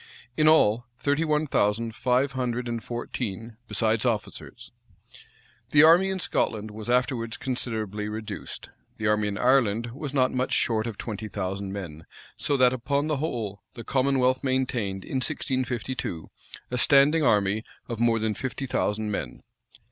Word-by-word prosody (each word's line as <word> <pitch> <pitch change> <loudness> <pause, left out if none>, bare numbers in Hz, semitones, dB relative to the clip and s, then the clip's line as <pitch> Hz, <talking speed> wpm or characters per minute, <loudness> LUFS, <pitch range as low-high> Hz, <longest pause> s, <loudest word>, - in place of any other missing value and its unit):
In 155 +2 +3
all, 120 -7 +4
thirty 145 +4 +1
one 155 -1 +1
thousand 115 -3 +1
five 130 +2 +1
hundred 125 -2 -2
and 115 -1 -3
fourteen, 115 -2 -5
besides 110 +1 +1
officers.[] 115 -4 -3 1.0
The 145 +1 +6
army 170 +4 +7
in 190 - -1
Scotland 110 - -1
was 110 +2 -7
afterwards 120 -2 0
considerably 110 -5 -3
reduced. 105 -1 -7 0.3
The 110 - -4
army 105 0 +2
in 100 -1 -3
Ireland 120 -3 +2
was 145 +3 -6
not 130 -2 +2
much 130 0 0
short 115 -1 +1
of 110 -3 -5
twenty 110 -1 -5
thousand 95 0 -4
men; 85 -6 -7 0.3
so 140 - 0
that, 125 -1 +5
upon 140 +3 0
the 155 -2 0
whole, 115 - -3
the 115 - -7
commonwealth 130 0 +2
maintained, 125 -8 -1
in 135 - -3
1652, 130 - -2 0.4
a 125 - -1
standing 145 +5 +5
army 105 -4 +2 0.2
of 115 -2 -5
more 115 -1 +3
than 110 -1 0
fifty 130 +3 -4
thousand 105 -4 -1
men. - - -5
120 Hz, 150 wpm, -26 LUFS, 105-130 Hz, 1.0 s, army